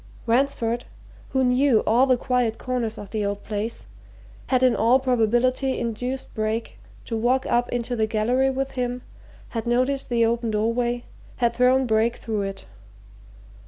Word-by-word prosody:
Ransford, 240 Hz, -1 st, +1 dB, 0.4 s
who 265 Hz, -1 st, +1 dB
knew 250 Hz, -2 st, +3 dB
all 245 Hz, +4 st, +4 dB
the 255 Hz, -1 st, +4 dB
quiet 250 Hz, -3 st, 0 dB
corners 245 Hz, -3 st, -3 dB
of 205 Hz, -, -9 dB
the 215 Hz, -2 st, -1 dB
old 200 Hz, 0 st, -3 dB
place, 215 Hz, +2 st, -4 dB, 0.6 s
had 255 Hz, -1 st, +2 dB
in 255 Hz, -2 st, +4 dB
all 235 Hz, +4 st, +4 dB
probability 255 Hz, +1 st, +1 dB
induced 245 Hz, +3 st, -4 dB
Brake 220 Hz, +1 st, -3 dB, 0.3 s
to 230 Hz, -, -3 dB
walk 250 Hz, +4 st, +1 dB
up 240 Hz, 0 st, +1 dB
into 245 Hz, 0 st, -2 dB
the 220 Hz, -2 st, +1 dB
gallery 245 Hz, +5 st, +1 dB
with 270 Hz, +1 st, -2 dB
him, 250 Hz, -1 st, -3 dB, 0.5 s
had 230 Hz, 0 st, -4 dB
noticed 255 Hz, +3 st, 0 dB
the 235 Hz, -1 st, +3 dB
open 235 Hz, 0 st, 0 dB
doorway, 235 Hz, +3 st, 0 dB, 0.3 s
had 235 Hz, -2 st, +1 dB
thrown 255 Hz, +2 st, +3 dB
Brake 225 Hz, 0 st, +2 dB
through 215 Hz, -2 st, -3 dB
it. 195 Hz, 0 st, -5 dB
240 Hz, 155 wpm, -24 LUFS, 225-255 Hz, 0.6 s, all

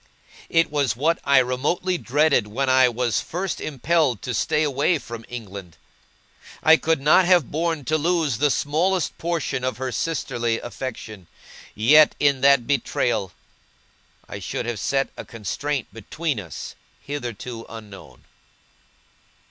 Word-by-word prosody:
It 165 Hz, -2 st, +2 dB
was 140 Hz, -6 st, 0 dB
what 160 Hz, +7 st, +1 dB
I 140 Hz, 0 st, +4 dB
remotely 145 Hz, +9 st, +1 dB
dreaded 140 Hz, -4 st, +2 dB
when 130 Hz, +6 st, -2 dB
I 130 Hz, -1 st, +5 dB
was 120 Hz, -1 st, -1 dB
first 180 Hz, +2 st, -4 dB
impelled 150 Hz, -, 0 dB
to 125 Hz, -, -3 dB
stay 150 Hz, +6 st, +1 dB
away 145 Hz, +4 st, +1 dB
from 115 Hz, -4 st, -9 dB
England. 100 Hz, -7 st, -8 dB, 0.9 s
I 160 Hz, 0 st, +8 dB
could 160 Hz, -1 st, 0 dB
not 155 Hz, +6 st, +5 dB
have 175 Hz, -6 st, +3 dB
borne 160 Hz, -2 st, -1 dB
to 155 Hz, +5 st, +1 dB
lose 160 Hz, -6 st, 0 dB
the 150 Hz, +1 st, +3 dB
smallest 165 Hz, +6 st, 0 dB
portion 165 Hz, -6 st, -2 dB
of 130 Hz, 0 st, -2 dB
her 130 Hz, 0 st, -3 dB
sisterly 120 Hz, -6 st, -2 dB
affection; 110 Hz, -7 st, -7 dB, 0.5 s
yet, 150 Hz, +8 st, +5 dB
in 140 Hz, -2 st, +2 dB
that 140 Hz, -3 st, +5 dB
betrayal, 120 Hz, -7 st, 0 dB, 1.0 s
I -, -, -7 dB
should -, -, -4 dB
have 120 Hz, -3 st, -3 dB
set 135 Hz, +6 st, 0 dB
a -, -, -7 dB
constraint 130 Hz, +5 st, -4 dB
between 140 Hz, +5 st, -3 dB
us 85 Hz, -5 st, -8 dB, 0.3 s
hitherto 120 Hz, -4 st, -6 dB
unknown. 100 Hz, -, -12 dB
135 Hz, 135 wpm, -23 LUFS, 120-155 Hz, 1.0 s, I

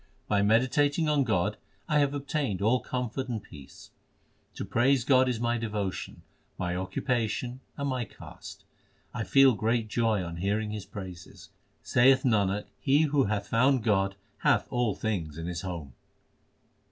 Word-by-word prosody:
By 100 Hz, -1 st, +2 dB
meditating 135 Hz, +9 st, +2 dB
on 150 Hz, -2 st, +3 dB
God 100 Hz, -8 st, 0 dB, 0.3 s
I 150 Hz, -, +3 dB
have 145 Hz, 0 st, +1 dB
obtained 140 Hz, -, -2 dB
all 115 Hz, +5 st, +3 dB
comfort 125 Hz, +1 st, -3 dB
and 115 Hz, -3 st, -2 dB
peace. 75 Hz, -9 st, -14 dB, 0.6 s
To -, -, -4 dB
praise 120 Hz, +5 st, +2 dB
God 130 Hz, -1 st, +4 dB
is 120 Hz, -3 st, -1 dB
my 120 Hz, 0 st, 0 dB
devotion, 105 Hz, -5 st, -4 dB, 0.3 s
my 90 Hz, -1 st, -2 dB
occupation, 120 Hz, +5 st, -2 dB, 0.2 s
and 140 Hz, -1 st, -2 dB
my 130 Hz, -3 st, -1 dB
caste. -, -, -12 dB, 0.5 s
I -, -, -2 dB
feel 135 Hz, -1 st, +5 dB
great 110 Hz, +1 st, 0 dB
joy 110 Hz, -4 st, +1 dB
on 85 Hz, -1 st, -6 dB
hearing 105 Hz, +4 st, -1 dB
His 105 Hz, -2 st, -6 dB
praises. 95 Hz, -5 st, -10 dB, 0.3 s
Saith 130 Hz, +2 st, +4 dB
Nanak, 105 Hz, -4 st, +1 dB
he 145 Hz, +3 st, +3 dB
who 145 Hz, -3 st, +2 dB
hath 100 Hz, 0 st, -2 dB
found 125 Hz, +1 st, +3 dB
God 100 Hz, -3 st, +1 dB, 0.2 s
Hath -, -, +3 dB
all 120 Hz, -4 st, +1 dB
things 85 Hz, -9 st, -3 dB
in 80 Hz, -, -5 dB
his 85 Hz, 0 st, -4 dB
home. 85 Hz, -8 st, -6 dB
115 Hz, 155 wpm, -28 LUFS, 100-130 Hz, 0.6 s, feel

